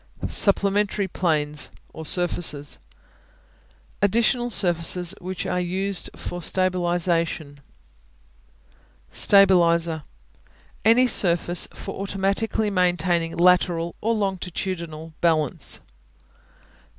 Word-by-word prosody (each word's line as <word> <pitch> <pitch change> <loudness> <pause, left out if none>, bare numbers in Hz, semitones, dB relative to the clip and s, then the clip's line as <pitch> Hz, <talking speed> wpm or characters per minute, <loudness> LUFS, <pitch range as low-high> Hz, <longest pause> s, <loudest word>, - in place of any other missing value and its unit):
Supplementary 200 0 +3
Planes 150 -5 -1 0.2
(or 160 -1 -7
surfaces) 165 -5 -1 1.2
Additional 235 +4 +1
surfaces 175 -2 +1
which 185 0 -6
are 180 - -1
used 185 0 -1
for 175 - -7
stabilization. 175 -5 0 1.5
Stabilizer 170 -5 +3 0.8
Any 230 +4 +5
surface 175 -6 +3
for - - -7
automatically 200 +2 -1
maintaining 175 -2 0
lateral 175 -1 +2
or 225 +1 0
longitudinal 180 -5 -4
balance. 155 -5 0
180 Hz, 75 wpm, -23 LUFS, 165-195 Hz, 1.5 s, Any